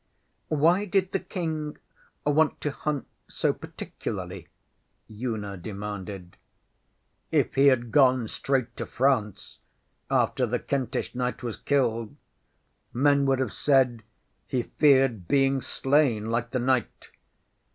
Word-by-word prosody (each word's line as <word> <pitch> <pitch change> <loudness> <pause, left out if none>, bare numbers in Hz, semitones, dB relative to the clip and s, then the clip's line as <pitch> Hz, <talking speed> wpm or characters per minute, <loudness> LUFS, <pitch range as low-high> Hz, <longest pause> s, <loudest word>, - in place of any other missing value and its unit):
ŌĆÖ 155 - +1
ŌĆśWhy 180 +7 +3
did 190 -2 +2
the 195 - 0
King 155 -4 -4 0.5
want 150 +1 +2
to 150 - -2
hunt 145 0 -3 0.2
so - - 0
particularly? - - -7 0.6
ŌĆÖ 110 +4 -7
Una 100 -2 -6
demanded. 100 -2 -7 0.9
ŌĆśIf - - +2
he 140 +1 +5
had 120 -4 +3
gone 130 -5 +4
straight 125 0 -1
to - - -5
France 120 -6 0 0.5
after 125 - +2
the 125 +2 0
Kentish 130 -1 -2
knight 125 0 -3
was 120 -3 -3
killed, 115 -6 0 0.8
men 140 +2 +3
would 135 -1 +3
have 130 -5 -2
said 130 -5 +2 0.5
he 125 -2 -1
feared 135 - +3
being 135 +2 +2
slain 130 -7 +1
like 115 0 -1
the 125 - -2
knight. 125 -1 -1
130 Hz, 125 wpm, -26 LUFS, 115-140 Hz, 0.9 s, he